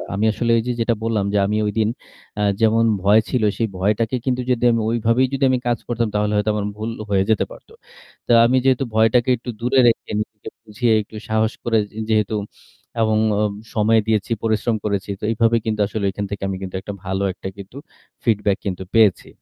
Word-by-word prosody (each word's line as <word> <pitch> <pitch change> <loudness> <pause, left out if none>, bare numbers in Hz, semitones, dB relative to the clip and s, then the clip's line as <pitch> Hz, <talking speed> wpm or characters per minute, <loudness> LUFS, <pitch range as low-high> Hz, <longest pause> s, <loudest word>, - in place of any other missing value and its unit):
আমি 105 +2 0
আসলে 120 +2 -1
ওইযে 120 +2 -1
যেটা 115 +1 +2
বললাম 110 -3 0
যে - - +2
আমি 105 +2 0
ওইদিন 110 +1 0 0.5
আ - - 0 0.2
যেমন 115 +1 +4 0.2
ভয় 105 +3 +6
ছিল 125 -4 0
সেই 115 - 0
ভয়টাকে 110 +5 0
কিন্তু 125 -1 0
যদি 125 -1 0
আমি 115 - +1
ওইভাবেই 115 +3 +2
যদি 135 - -1
আমি 130 - +2
কাজ 120 -1 +1
করতাম 120 -1 0
তাহলে 105 0 +1
হয়তো 105 +1 +1
আমার 105 -1 -2
ভুল 110 +2 -4 0.2
হয়ে 95 -1 +2
যেতে 110 - +2
পারত। - - -14 0.6
তো - - +1
আমি 125 +2 +3
যেহেতু 135 0 +3
ভয়টাকে 115 +3 +3
একটু 120 +2 -9
দূরে 125 +3 +2
রেখে 115 - +1
নিজেকে 105 0 -6 0.2
বুঝিয়ে 110 +2 0
একটু 105 +1 -13
সাহস 110 0 +1
করে 115 -1 +1 0.3
যেহেতু 110 -1 +1 0.7
এবং 110 -1 +2 0.2
ও - - +2 0.3
সময় 110 +1 +4
দিয়েছি, 110 0 0
পরিশ্রম 110 +1 +1
করেছি 100 -1 -2
তো - - -17
এভাবে 115 +1 +2
কিন্তু 110 -1 -2
আসলে 100 -1 -3
এখান 100 +1 -4
থেকে 100 -1 -5
আমি 95 - -3
কিন্তু 95 -1 -6
একটা 100 +2 -6
ভালো 95 +1 -1
একটা 95 - -8
কিন্তু 100 +7 -11 0.5
feedback 105 -4 +1
কিন্তু 95 -1 -3
পেয়েছি। 105 -5 +4
110 Hz, 195 wpm, -20 LUFS, 105-115 Hz, 0.7 s, ভয়